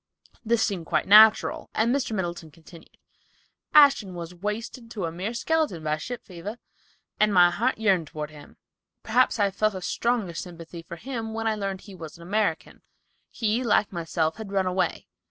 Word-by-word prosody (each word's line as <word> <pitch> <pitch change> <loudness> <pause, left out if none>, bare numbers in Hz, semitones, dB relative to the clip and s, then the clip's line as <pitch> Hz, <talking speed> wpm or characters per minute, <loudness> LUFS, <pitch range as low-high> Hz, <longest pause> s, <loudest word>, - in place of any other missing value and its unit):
This 230 0 +2
seemed 180 -6 -2
quite - - +1
natural, 215 +2 +6
and 235 +4 +2
Mr. 275 -4 -2
Middleton 175 -5 -4
continued: 165 +2 -17 0.7
"Ashton 275 -11 +5
was 170 0 -7
wasted 215 +6 -5
to 205 -6 -4
a 165 - -3
mere 190 +8 -4
skeleton 300 - 0
by 155 0 0
ship 240 +10 -7
fever, 190 +5 -8 0.6
and 215 0 +4
my 175 -2 +6
heart 245 +8 0
yearned 195 -7 +2
toward 150 0 -6
him. 150 -1 -14 0.5
Perhaps 245 +3 +2
I 200 -2 +2
felt 215 +1 0
a 185 - -5
stronger 235 -6 -1
sympathy 170 -1 -8
for 170 +1 -9
him 225 +2 -5
when 225 0 -3
I 220 - +2
learned 195 -2 -4
that - - -17
he 200 - -11
was 165 -3 -10
an 170 - -13
American. 200 -2 -2 0.5
He, 225 +2 -1
like 215 -3 +2
myself, 165 -1 -2
had 220 -3 -8
run 195 -1 +1
away. 185 0 -1
200 Hz, 180 wpm, -25 LUFS, 170-225 Hz, 0.7 s, natural